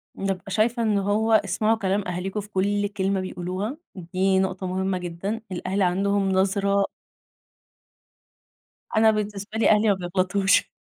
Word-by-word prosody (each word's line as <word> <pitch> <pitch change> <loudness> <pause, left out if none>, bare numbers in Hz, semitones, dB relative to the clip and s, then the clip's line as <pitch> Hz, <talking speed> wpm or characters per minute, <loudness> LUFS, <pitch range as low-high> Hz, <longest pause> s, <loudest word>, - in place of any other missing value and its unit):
بابقى 195 0 -3
شايفة 230 +4 +1
إنّه 210 -3 +2
هو 220 +2 +1
اسمعوا 215 +2 +2
كلام 200 -1 -1
أهاليكم 185 +3 -3
في 205 - -8
كل 205 +1 0
كلمة 195 -1 -1
بيقولوها، 185 - -4 0.2
دي 190 +2 0
نقطة 190 0 -1
مهمّة 190 +1 -1
جدًا. 180 +5 -4
الأهل 185 +2 -2
عندهم 195 +2 +1
نظرة 200 +1 +2 2.1
أنا 220 0 +6
بالنسبة 210 0 -4
لي - - +4
أهلي 215 +1 +4
ما - - +5
بيغلطوش. 185 +2 +1
195 Hz, 135 wpm, -24 LUFS, 185-210 Hz, 2.1 s, أنا